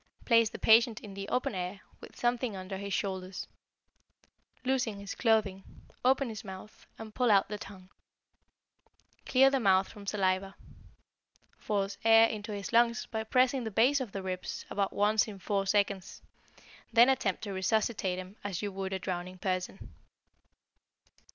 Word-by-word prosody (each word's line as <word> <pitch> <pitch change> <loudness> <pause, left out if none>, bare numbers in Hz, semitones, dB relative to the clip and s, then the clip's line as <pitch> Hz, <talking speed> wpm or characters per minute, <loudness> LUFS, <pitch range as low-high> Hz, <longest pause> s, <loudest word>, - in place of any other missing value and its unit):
Place 230 -2 +4
the - - -8
patient 225 0 +5
in 205 -2 -10
the 195 0 -6
open 250 - 0
air, 185 +1 -4 0.2
with - - -13
something 240 -2 -1
under 190 +1 -6
his 200 +1 -6
shoulders. 190 -1 -3 1.2
Loosen 250 -5 0
his 200 0 -6
clothing, 215 -5 +1 0.4
open 265 0 +3
his 220 0 -7
mouth, 190 +1 -11
and 220 -1 -9
pull 250 0 +1
out 200 -2 +4
the 210 0 -5
tongue. 185 -2 -11 1.4
Clear 270 +1 +5
the 270 - +2
mouth 195 -4 +3
from 205 -2 -12
saliva. 195 -1 0 1.0
Force 200 -1 -2
air 225 0 +7
into 210 -1 -6
his 200 +2 -5
lungs 235 +1 +3
by 220 -1 -2
pressing 255 +3 +2
the 220 - -3
base 250 +7 +3
of 240 -6 -5
the 195 -1 -5
ribs 185 -1 -5
about 200 -1 0
once 210 +1 +2
in 205 -2 -8
four 195 0 -1
seconds, 200 -2 -1 0.7
then 235 +1 +7
attempt 225 -9 0
to 205 -2 -4
resuscitate 190 -1 0
him 185 +3 -9
as 200 -1 -4
you 205 - -2
would 190 0 -4
a - - 0
drowning 185 0 -5
person. 185 0 -4
205 Hz, 155 wpm, -30 LUFS, 190-225 Hz, 1.4 s, air